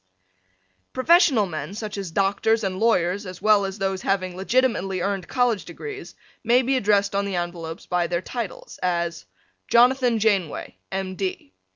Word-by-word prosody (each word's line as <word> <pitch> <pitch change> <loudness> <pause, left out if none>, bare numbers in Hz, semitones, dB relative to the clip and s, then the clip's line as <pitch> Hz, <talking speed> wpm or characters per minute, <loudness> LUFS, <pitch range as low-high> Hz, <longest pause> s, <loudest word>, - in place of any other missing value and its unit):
Professional 280 - +4
men 160 +1 -6
such 215 -1 -5
as 195 -3 -4
doctors 200 +5 +1
and 190 -1 -2
lawyers 200 -3 +1
as 185 -1 -8
well 210 -1 +4
as 195 +1 -5
those 195 -1 -2
having 185 -2 -1
legitimately 195 -2 +1
earned 195 -1 -2
College 245 -5 +1
Degrees 415 -2 -8 0.3
may 245 +3 +4
be 265 +2 +1
addressed 200 -4 +2
on 200 0 +1
the 200 -2 -3
envelopes 170 -2 -5
by 175 -1 0
their 175 0 -1
titles, 235 -7 -6
as 170 -2 -1 0.4
Jonathan 245 0 +4
Janeway, 200 -7 0 0.2
M. 190 -1 -3
D. 185 - -4
195 Hz, 155 wpm, -24 LUFS, 185-230 Hz, 0.4 s, Professional